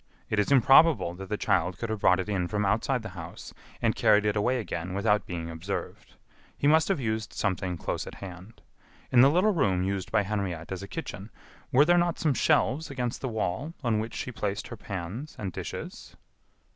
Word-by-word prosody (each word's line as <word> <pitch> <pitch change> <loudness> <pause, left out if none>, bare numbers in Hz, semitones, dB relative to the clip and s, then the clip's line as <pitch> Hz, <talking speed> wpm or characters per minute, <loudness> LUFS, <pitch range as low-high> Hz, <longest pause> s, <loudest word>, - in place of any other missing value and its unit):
It 105 - +2
is 105 - +1
improbable 135 - +6
that 95 +2 -9
the 105 - -1
child 90 -1 +1
could 115 +1 -4
have 110 - -2
brought 90 -1 +4
it 95 - -3
in 95 -4 -1
from 105 +1 -1
outside 115 +5 +1
the 110 - -6
house 85 -3 -9 0.3
and - - +3
carried 105 0 +4
it 105 0 +1
away 125 +5 +1
again 90 -3 -4
without 105 +1 +1
being 85 -2 -4
observed. 85 +5 -6 0.4
He - - -2
must 155 +2 +5
have 195 -6 +1
used 110 -3 -2
something 95 -2 -1
close - - -3
at - - -8
hand. 95 +3 -11 0.5
In 120 - +7
the 135 - +7
little 185 +7 +3
room 95 - +1
used 95 -1 -2
by 105 - +3
Henriette 95 -5 -3
as 95 - -4
a 100 - -7
kitchen, 100 - -6 0.4
were 140 +4 +6
there 175 +2 +5
not 175 -1 +1
some 155 -3 +1
shelves 145 +4 +2
against 125 -4 -3
the 130 - -2
wall 110 - -3
on 115 -3 +1
which 110 +1 -5
she 125 - -4
placed 105 -3 -3
her - - -6
pans 105 - -6
and 95 -3 -4
dishes?" - - -7
105 Hz, 205 wpm, -28 LUFS, 95-130 Hz, 0.5 s, In